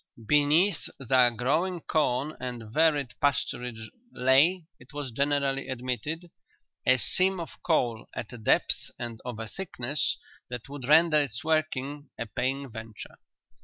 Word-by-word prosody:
Beneath 150 Hz, -, +3 dB
their 130 Hz, -2 st, +4 dB
growing 155 Hz, -, 0 dB
corn 150 Hz, -1 st, 0 dB
and 120 Hz, -4 st, -6 dB
varied 145 Hz, -5 st, +2 dB
pasturage 125 Hz, -4 st, 0 dB, 0.3 s
lay, 140 Hz, +8 st, +4 dB
it 125 Hz, +2 st, -17 dB
was 145 Hz, -3 st, -4 dB
generally 140 Hz, +1 st, 0 dB
admitted, 130 Hz, +7 st, -3 dB, 0.6 s
a 130 Hz, 0 st, +6 dB
seam 185 Hz, +8 st, +2 dB
of 165 Hz, -, -8 dB
coal 120 Hz, -9 st, +1 dB
at 120 Hz, -, -5 dB
a 120 Hz, -, -8 dB
depth 110 Hz, -, +1 dB
and 120 Hz, -2 st, -5 dB
of 125 Hz, -3 st, -5 dB
a 115 Hz, 0 st, -5 dB
thickness 145 Hz, -, -2 dB, 0.3 s
that 125 Hz, -2 st, -6 dB
would 140 Hz, -3 st, -7 dB
render 160 Hz, +1 st, +6 dB
its 120 Hz, -5 st, -1 dB
working 150 Hz, -3 st, -1 dB
a 115 Hz, -, -3 dB
paying 135 Hz, +5 st, -2 dB
venture. 110 Hz, -1 st, -9 dB
135 Hz, 135 wpm, -28 LUFS, 120-155 Hz, 0.6 s, a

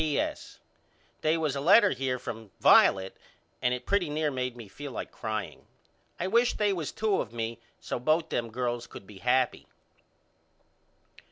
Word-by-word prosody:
P.S. 150 Hz, -3 st, -2 dB, 0.6 s
They 155 Hz, +1 st, +2 dB
was 155 Hz, -4 st, -1 dB
a 140 Hz, -, -2 dB
letter 195 Hz, +6 st, +6 dB
here 130 Hz, -1 st, -1 dB
from 115 Hz, -3 st, -7 dB
Violet 95 Hz, 0 st, +5 dB, 0.5 s
and 125 Hz, -, +2 dB
it 125 Hz, 0 st, -3 dB
pretty 195 Hz, -5 st, +1 dB
near 150 Hz, 0 st, 0 dB
made 125 Hz, -2 st, -3 dB
me 115 Hz, -3 st, -9 dB
feel 145 Hz, +7 st, -8 dB
like -, -, -6 dB
crying. 110 Hz, -3 st, -5 dB, 0.5 s
I 175 Hz, -, -1 dB
wish 235 Hz, +5 st, +3 dB
they 205 Hz, -1 st, +2 dB
was 165 Hz, -6 st, -3 dB
two 215 Hz, -2 st, 0 dB
of 110 Hz, -, -7 dB
me 115 Hz, 0 st, -4 dB, 0.2 s
so -, -, -4 dB
both 155 Hz, +6 st, +1 dB
them 115 Hz, -1 st, -2 dB
girls 120 Hz, 0 st, -3 dB
could 100 Hz, -, -11 dB
be 100 Hz, -1 st, -13 dB
happy. 125 Hz, +2 st, +1 dB
130 Hz, 165 wpm, -28 LUFS, 120-160 Hz, 0.6 s, letter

